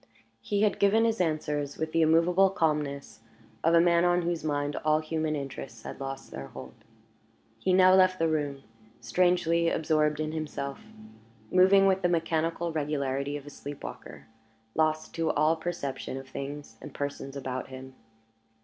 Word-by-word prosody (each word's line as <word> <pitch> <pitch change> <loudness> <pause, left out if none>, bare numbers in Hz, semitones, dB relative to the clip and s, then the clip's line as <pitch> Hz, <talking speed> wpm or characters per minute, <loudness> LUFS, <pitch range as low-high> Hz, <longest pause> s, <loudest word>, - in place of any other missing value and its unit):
He 205 - 0
had 210 - +1
given 215 +3 +4
his 225 -3 +1
answers 150 -3 -1
with 160 0 -3
the 165 - +2
immovable 170 +4 +4
calmness 150 - -2 0.4
of 165 +1 +4
a - - +7
man 170 0 +4
on 175 0 +3
whose 170 -2 -2
mind 145 -1 -1
all 155 0 +2
human 155 0 -2
interests 135 -5 -7
had - - -8
lost 135 0 -6
their 70 0 -7
hold. 65 -2 -10 0.9
He 190 - 0
now 185 0 +6
left 185 0 +5
the 165 - +1
room, 145 -3 -2 0.4
strangely 170 +5 +2
absorbed 150 -2 +1
in 155 0 -2
himself; 150 -3 -5 0.7
moving 190 +2 +6
with 190 0 +3
the 175 - +2
mechanical 165 0 0
regularity 145 -2 -2
of 145 - -11
a 145 - -10
sleep 145 0 -9
walker; - - -9 0.5
lost 155 0 0
to 165 -1 -1
all 155 +2 +3
perception 160 -6 -4
of 135 0 -8
things 140 -3 -7
and - - -10
persons 140 -1 -5
about 130 -2 -4
him. 130 0 -10
155 Hz, 160 wpm, -28 LUFS, 140-170 Hz, 0.9 s, a